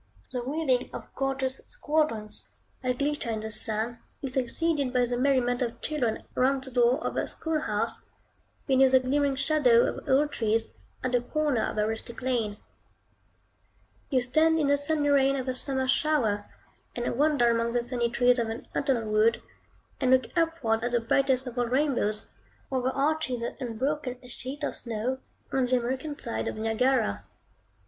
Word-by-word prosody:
The 250 - -2
wheeling 265 -2 0
of - - -8
gorgeous 270 -1 -2
squadrons, 300 - -1 0.3
that 250 -1 -1
glitter 290 -3 -1
in 220 -1 -2
the 220 0 -5
sun, 220 +2 -1 0.2
is 265 -2 -4
succeeded 280 +2 0
by 250 -1 +3
the 245 0 -2
merriment 250 -1 +2
of 235 -1 -2
children 255 -8 -1
round 265 +1 +2
the 265 - -7
door 245 +1 +4
of - - -2
a - - 0
school 320 -1 -2
house, - - -2 0.6
beneath 265 -1 +4
the 260 - +8
glimmering 275 +2 +1
shadow 265 -5 +4
of - - -4
old 290 +3 +3
trees, 225 0 0 0.3
at 255 - -1
the 245 -1 +2
corner 290 -1 0
of - - -2
a 210 - +2
rustic 225 +2 -5
lane. 230 -5 0 1.5
You 255 -3 +2
stand 315 +6 +3
in 310 - +2
the 285 - +5
sunny 290 +1 +1
rain 275 -1 +4
of 265 -1 -3
a 255 - 0
summer 265 0 -1
shower, 255 -9 +1 0.5
and 240 0 -2
wander 280 -4 +3
among 230 0 0
the 240 -1 +1
sunny 240 -1 -1
trees 245 +1 +3
of 230 -1 0
an 225 +1 -6
autumnal 260 -6 0
wood, 215 +2 +3 0.6
and 260 - +1
look 260 -2 +3
upward 320 -10 +1
at 245 0 -1
the 240 - +4
brightest 265 +3 +2
of 245 -1 -5
all 245 - +1
rainbows, 245 -5 0 0.4
overarching 265 +2 0
the 235 0 -4
unbroken 255 +2 -2
sheet 260 +4 -7
of - - -1
snow, 235 +3 -3 0.3
on 265 -1 +2
the 250 +1 +3
American 260 +5 -3
side 110 0 -3
of - - -3
Niagara. 225 - +1
255 Hz, 170 wpm, -28 LUFS, 235-280 Hz, 1.5 s, the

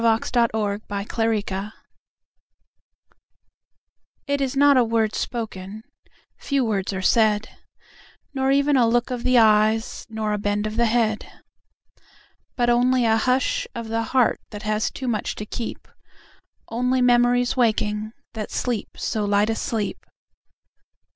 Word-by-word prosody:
It - - -3
Is 225 +1 +1
Not 235 -2 +3
a 220 - -3
Word 205 0 -2 2.5
It 285 0 -1
is 270 0 -1
not 285 0 +6
a 255 - +5
word 225 -2 0
spoken, 215 -3 -5 0.6
Few 275 -3 0
words 200 -3 -1
are 190 -1 -4
said; 215 0 +2 0.8
Nor 265 -1 0
even 280 +1 +3
a 240 -2 +4
look 240 +2 +1
of 245 -1 -3
the 255 0 +3
eyes 220 0 +3
Nor 220 -1 -2
a 210 - -1
bend 205 +1 -1
of 215 0 -4
the 235 0 +2
head, 220 -2 0 1.2
But 240 -1 +2
only 245 +1 +3
a 220 -1 +4
hush 265 - 0
of 230 -1 -6
the 225 0 0
heart 250 0 +2
That 210 -1 -8
has 215 0 0
too 260 - -6
much 220 -3 -2
to 210 - -6
keep, 230 +2 -6 0.8
Only 250 +2 0
memories 245 0 +3
waking 215 -3 0 0.2
That 215 -2 -5
sleep 240 -4 -2
so 220 -3 -2
light 205 +1 +2
a - - -1
sleep. 225 -4 -3
225 Hz, 140 wpm, -23 LUFS, 215-245 Hz, 2.5 s, not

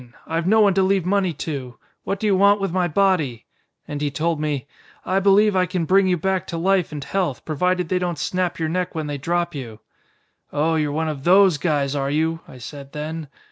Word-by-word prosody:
I've 165 +1 -2
no 220 +3 +5
one 200 -2 +5
to 195 - +2
leave 190 -2 +2
money 190 -1 +1
to. 130 -6 -5 0.3
What 195 - -2
do 215 - -3
you 205 -2 +3
want 200 +2 +5
with 195 -2 -2
my 180 0 +1
body?' 170 - +1 0.4
And 145 0 -5
he 145 - 0
told 155 +2 -1
me, 145 -4 -2 0.4
'I 190 +1 +1
believe 200 +1 +4
I 185 -1 +2
can 175 -1 -2
bring 190 +3 +4
you 180 -1 +2
back 190 +2 -1
to 170 - -4
life 185 0 +1
and 145 -2 -5
health, 180 -8 -2
provided 180 +3 0
they 185 - +1
don't 175 -2 -2
snap 180 +4 -1
your 160 -1 -1
neck 180 +1 -2
when 160 -1 -2
they 145 -1 -4
drop 175 +4 -1
you.' 120 -7 -7 0.7
'Oh, 155 +3 +1
you're 155 -2 0
one 160 +2 -1
of 145 -3 -4
those 185 -2 +5
guys, 145 -4 0
are 135 -1 -1
you?' 160 +3 0
I 130 - -12
said 140 +2 -10
then. 155 +1 -5
170 Hz, 220 wpm, -22 LUFS, 150-185 Hz, 0.7 s, no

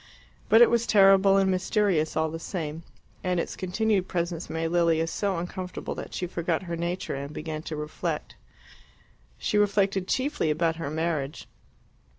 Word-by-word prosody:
But 225 +2 +8
it - - +5
was 235 0 +2
terrible 195 -1 +6
and 195 -1 +3
mysterious 185 -4 +1
all 160 0 +1
the 165 - -5
same, 160 -2 -4 0.4
and 180 -1 0
its - - -3
continued 195 +1 0
presence 170 -1 -3
made 165 0 -2
Lilia 165 -1 +2
so 190 +3 -1
uncomfortable 180 +1 -5
that - - -7
she 180 - -2
forgot 170 -1 -2
her 170 -2 -4
nature 175 +2 -3
and 140 +1 -5
began 155 0 -5
to 160 - -6
reflect. 150 0 -4 1.0
She 210 - 0
reflected 195 -2 +2
chiefly 275 - 0
about 160 +1 +1
her 165 -4 -4
marriage. 155 -2 -2
175 Hz, 160 wpm, -27 LUFS, 160-195 Hz, 1.0 s, But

